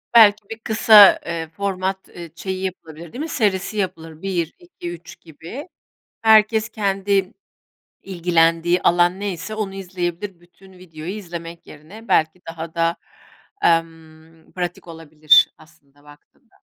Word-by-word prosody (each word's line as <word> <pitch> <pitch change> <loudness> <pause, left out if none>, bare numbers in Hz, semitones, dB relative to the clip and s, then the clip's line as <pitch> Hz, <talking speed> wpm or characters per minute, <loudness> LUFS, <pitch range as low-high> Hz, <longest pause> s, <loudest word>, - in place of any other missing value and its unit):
Belki 210 -2 +6
bir 225 0 -7
kısa, 220 -2 +7
ııı, 165 -1 -4
format, 190 +1 -3
ııı, 170 -1 -10
şeyi 190 +1 -5
yapılır 165 -4 -7 0.2
değil 250 - -8
mi? 315 +2 -4
Serisi 210 -5 -1
yapılır 165 -5 -4
1-2-3 175 - -6
gibi. 170 - -10 0.5
Herkes 220 0 +4
kendi 195 -3 -1 0.7
ilgilendiği 170 -1 +1
alan 175 +2 +3
neyse 205 +1 -4
onu 210 -3 -4
izleyebilir 180 0 -5
bütün 180 +2 -20
videoyu 175 -2 -9
izlemek 170 -4 -8
yerine 190 +10 -14
belki 165 0 +1
daha 165 0 -7
da, 165 0 0 0.7
emm, 165 -1 -2
pratik 175 -1 -5
olabilir, 155 -2 +3
aslında, 145 -3 -23
baktığında. 145 0 -21
175 Hz, 120 wpm, -21 LUFS, 165-200 Hz, 0.7 s, kısa